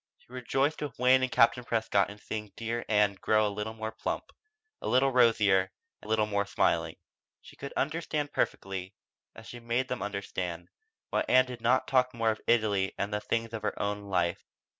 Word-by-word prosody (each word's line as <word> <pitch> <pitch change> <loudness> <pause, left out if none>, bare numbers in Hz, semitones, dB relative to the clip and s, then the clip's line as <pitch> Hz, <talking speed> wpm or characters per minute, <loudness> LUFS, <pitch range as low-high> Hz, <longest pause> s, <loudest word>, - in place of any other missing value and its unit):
She 125 - -21
rejoiced 135 +4 0
with 150 -2 -5
Wayne 130 +1 +5
and 130 -1 0
Captain 115 +1 +4
Prescott 110 -4 +1
in 100 - -10
seeing 105 -1 -6
dear 115 +1 -3
Ann 105 -2 +3
grow 110 0 +3
a 100 - -3
little 105 +2 -4
more 110 0 -4
plump, 110 - -4 0.5
a - - -4
little 135 +2 +3
rosier, 105 -6 +4 0.3
a - - -12
little 110 0 +2
more 100 -1 -1
smiling. - - +1 0.4
She - - -16
could 140 - -7
understand 150 -1 -2
perfectly, 95 0 -2 0.4
as - - -12
she 120 - -9
had 120 - -14
made 125 +3 0
them 125 - -3
understand, 95 -4 -4 0.4
why - - +1
Ann 130 0 +5
did 125 -2 -8
not 120 +3 +2
talk 130 -1 +2
more 115 -1 +2
of 110 - -6
Italy 105 -5 +2
and 100 +1 -2
the 105 - -1
things 115 +1 -2
of 110 - -4
her 105 - -3
own 105 0 -2
life. 90 -3 0
110 Hz, 195 wpm, -29 LUFS, 100-125 Hz, 0.5 s, Wayne